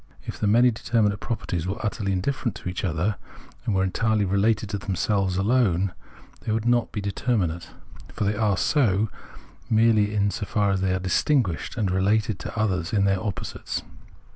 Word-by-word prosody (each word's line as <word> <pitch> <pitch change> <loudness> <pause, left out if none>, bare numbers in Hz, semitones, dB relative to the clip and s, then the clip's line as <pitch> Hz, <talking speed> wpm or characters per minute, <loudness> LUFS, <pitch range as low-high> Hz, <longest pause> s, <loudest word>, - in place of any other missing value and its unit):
If - - -7
the 105 - +1
many 120 +4 +5
determinate 110 -2 0
properties 90 -8 -3
were 95 - -2
utterly 100 -1 -1
indifferent 110 +4 -1
to - - -8
each 90 - -4
other, 90 +4 0 0.5
and 105 - +1
were 95 - +2
entirely 105 +2 +1
related 100 +3 +1
to 100 - -2
themselves 95 0 0
alone, 100 -4 +2 0.5
they - - -4
would 110 +1 -1
not 120 -1 +2
be 105 - -3
determinate; 100 -4 -1 0.4
for - - -3
they 100 +1 +1
are 105 -3 +1
so, 110 - +2 0.6
merely 110 -2 +3
in 100 -1 +2
so 100 - -4
far 105 -2 +1
as 95 -1 0
they 95 -1 +1
are - - -1
distinguished 95 - 0
and 100 -5 0
related 105 +3 +1
to - - -5
others 95 -3 0
as 100 - +3
their 95 -1 +2
opposites. 105 -3 -4
100 Hz, 175 wpm, -25 LUFS, 95-110 Hz, 0.6 s, many